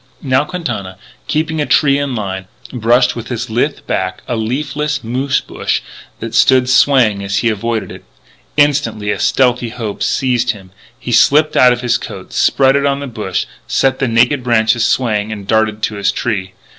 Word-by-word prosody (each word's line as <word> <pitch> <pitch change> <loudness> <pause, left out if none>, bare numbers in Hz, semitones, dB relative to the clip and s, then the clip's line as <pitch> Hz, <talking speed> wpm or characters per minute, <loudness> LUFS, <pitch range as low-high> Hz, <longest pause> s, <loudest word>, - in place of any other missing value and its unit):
Now 130 +1 +2
Quintana, 125 - -5 0.3
keeping 160 0 -1
a 145 - -1
tree 140 -2 +3
in 140 -3 -2
line, 95 -3 -4 0.3
brushed 125 +1 +2
with 120 -1 -6
his 115 -3 -4
lithe 130 +6 -1
back 95 0 -3
a 120 - -1
leafless 145 +5 -2
moose 130 +4 -1
bush - - -2 0.4
that - - -6
stood 130 -1 +4
swaying 125 -7 +3
as 100 0 -2
he 115 +2 +2
avoided 110 +1 -2
it. - - -11 0.5
Instantly 140 -8 +1
a - - -3
stealthy 125 -2 +1
hope 110 -3 -6
seized 125 -2 +1
him: 95 -3 -15 0.3
he 125 - -6
slipped 150 +6 +4
out 125 -1 +6
of 120 0 -1
his 120 -1 +1
coat, - - -9
spread 135 0 +3
it 140 0 +2
on 140 0 0
the 140 - -5
bush, 110 -7 -3 0.2
set 135 -1 +1
the 135 - +1
naked 125 +4 +2
branches 115 -1 +2
swaying, 110 -5 0
and 105 -2 -6
darted 110 0 0
to 105 - -1
his 100 - +1
tree. 95 -6 -3
120 Hz, 180 wpm, -15 LUFS, 110-135 Hz, 0.5 s, out